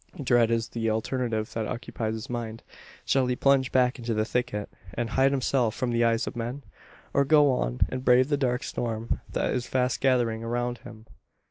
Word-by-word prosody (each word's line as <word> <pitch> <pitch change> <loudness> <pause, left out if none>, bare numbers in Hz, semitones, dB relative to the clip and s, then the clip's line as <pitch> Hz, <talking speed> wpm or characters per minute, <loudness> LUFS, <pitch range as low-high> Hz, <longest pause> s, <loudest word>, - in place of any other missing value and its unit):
Dread 120 -4 +3
is 115 0 0
the 115 -1 -1
alternative 110 0 -2
that 110 -2 -2
occupies 110 -2 -4
his 110 - -6
mind. 115 -2 -5 0.4
Shall 135 -2 +2
he 125 - 0
plunge 135 0 +3
back 125 0 +2
into 115 -1 -2
the 110 0 +1
thicket, 120 -3 -2 0.3
and 120 -1 -2
hide 135 +2 +4
himself 125 -4 +1
from 125 -2 -1
the 120 0 +2
eyes 115 0 +2
of - - -6
men? 120 +4 -4 0.5
Or 140 - +4
go 145 0 +5
on - - -2
and 130 0 -5
brave 125 +1 +5
the 145 - +3
dark 125 -3 0
storm 115 -1 -3
that - - 0
is 125 -1 -2
fast 125 -1 0
gathering 120 -4 +2
around 120 +1 -2
him? 110 -2 -12
120 Hz, 195 wpm, -27 LUFS, 115-130 Hz, 0.5 s, go